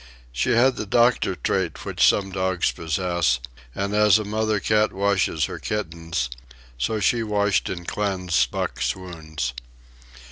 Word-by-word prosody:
She - - 0
had 125 +2 +4
the 105 - -4
doctor 120 +3 +3
trait - - -2
which - - 0
some 95 -1 +2
dogs 95 -1 0
possess; 85 -5 0 0.4
and 100 +1 -2
as 105 0 +5
a 110 - -2
mother 110 0 0
cat 110 +2 +2
washes 95 -5 +1
her - - -6
kittens, 85 -9 -3 0.5
so 85 - -1
she 115 +2 +2
washed 105 -2 +1
and 85 -2 -6
cleansed 95 -5 0
Buck's - - -2
wounds. 80 -8 -5
95 Hz, 140 wpm, -23 LUFS, 85-105 Hz, 0.5 s, as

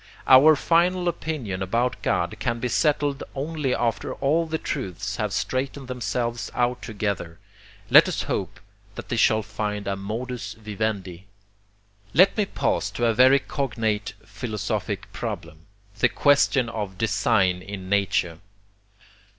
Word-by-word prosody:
Our 145 +4 +8
FINAL 175 +4 +2
opinion 150 - -3
about 115 +6 -1
God - - 0
can 115 0 -1
be 125 - -2
settled 145 -1 +1
only 145 -1 -1
after 115 -3 -1
all 160 +4 +1
the 160 0 -2
truths 100 - -4
have 105 -2 -1
straightened 130 +5 -2
themselves 120 -1 -3
out 125 0 0
together. 100 -7 -3 0.5
Let - - +9
us - - -2
hope - - -3 0.4
that - - -8
they - - -1
shall 110 0 +3
find 105 -1 -4
a 100 - 0
modus 110 +1 -5
vivendi! 100 -4 -4 0.9
Let 185 +6 +6
me 210 -2 0
pass 105 - -1
to 105 +4 -2
a 115 - +3
very 130 +4 +6
cognate 110 -8 -2
philosophic 110 -6 -4
problem, 80 0 -6 0.3
the - - +4
QUESTION 140 -3 +3
of 105 -4 -5
DESIGN 95 -4 +2
IN 95 -1 -8
NATURE. 95 -4 0
115 Hz, 135 wpm, -24 LUFS, 100-135 Hz, 0.9 s, Let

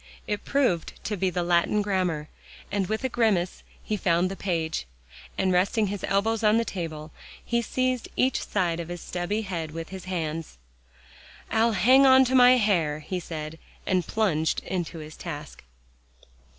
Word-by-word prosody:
It 210 -1 -3
proved 250 - +1
to 210 - -2
be 190 -1 0
the 180 0 -1
Latin 175 +4 +2
grammar, 180 -7 -1 0.4
and 200 -2 0
with 220 +5 -2
a - - +2
grimace, 215 -7 +1 0.2
he 215 - -1
found 180 -1 +1
the - - -4
page, 165 - -2 0.5
and 190 -1 +2
resting 200 +5 +2
his 200 - -6
elbows 220 +3 +1
on 215 +1 +5
the 230 - +1
table, 160 -6 -5 0.3
he 235 0 +1
seized 255 +1 -1
each 260 0 +2
side 175 -4 0
of 170 - -5
his 175 0 -6
stubby 180 +6 -3
head 170 -5 -4
with 165 +1 -7
his 190 -1 -8
hands. 165 - -4 0.9
"I'll 225 +1 +3
hang 255 +8 +6
on 260 0 +7
to 255 - -1
my 250 -1 +8
hair," 170 -9 +1
he 185 +4 -4
said, 160 -2 -6 0.3
and 185 -3 +1
plunged 165 -8 +1
into 175 -2 -3
his 155 0 -9
task. 150 -4 -8
185 Hz, 165 wpm, -26 LUFS, 165-220 Hz, 0.9 s, my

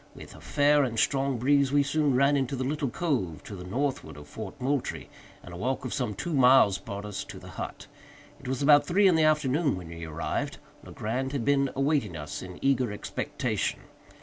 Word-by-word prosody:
With - - -11
a - - -14
fair 145 0 +3
and 120 -4 -2
strong 135 +1 +1
breeze 140 +2 +3
we 145 0 +4
soon 145 -1 +1
ran 140 +2 +4
into 135 0 0
the 130 - -2
little 145 +1 -1
cove 120 - -2
to 100 - -8
the 90 - -8
northward 130 - -3
of 75 0 -11
Fort 110 - -8
Moultrie, 135 +1 -2 0.3
and 90 - -10
a - - -7
walk 130 +7 -2
of 125 - -3
some 120 -6 -2
two 170 - -4
miles 125 -7 +5
brought 100 +1 -7
us 105 -2 -4
to - - -9
the - - -11
hut. - - -7 0.5
It - - -11
was 130 +1 -2
about 145 0 +6
three 195 +3 +4
in 185 - +5
the 160 -1 +4
afternoon 150 - +2
when 90 -2 -9
we 85 0 -8
arrived. 80 +1 -3 0.3
Legrand 130 +5 -3
had 135 -5 -2
been 140 -1 +3
awaiting 135 - 0
us 75 -1 -6
in 90 -1 -9
eager 130 -4 +2
expectation. 105 - -3
130 Hz, 205 wpm, -28 LUFS, 105-145 Hz, 0.5 s, about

